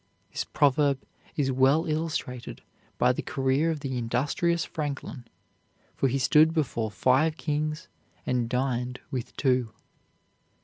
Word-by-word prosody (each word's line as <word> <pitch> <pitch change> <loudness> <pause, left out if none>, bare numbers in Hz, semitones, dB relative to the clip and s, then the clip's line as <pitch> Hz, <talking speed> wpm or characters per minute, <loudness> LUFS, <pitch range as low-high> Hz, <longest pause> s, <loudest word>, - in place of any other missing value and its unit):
This - - -2
proverb 140 -1 +2 0.4
is 135 -3 +1
well 135 +5 +3
illustrated 155 -6 -3 0.3
by - - +4
the - - -3
career 135 +4 +1
of 155 -3 -2
the 130 -3 -2
industrious 145 +8 0
Franklin, 145 -4 -5 0.7
for 135 - +1
he 130 +1 0
stood 155 +5 +4
before 120 -8 0
five 135 +8 +2
kings 155 +2 -2 0.4
and 125 -2 0
dined 125 -1 -1
with 125 -4 -5
two. 125 -4 +1
135 Hz, 125 wpm, -27 LUFS, 125-155 Hz, 0.7 s, by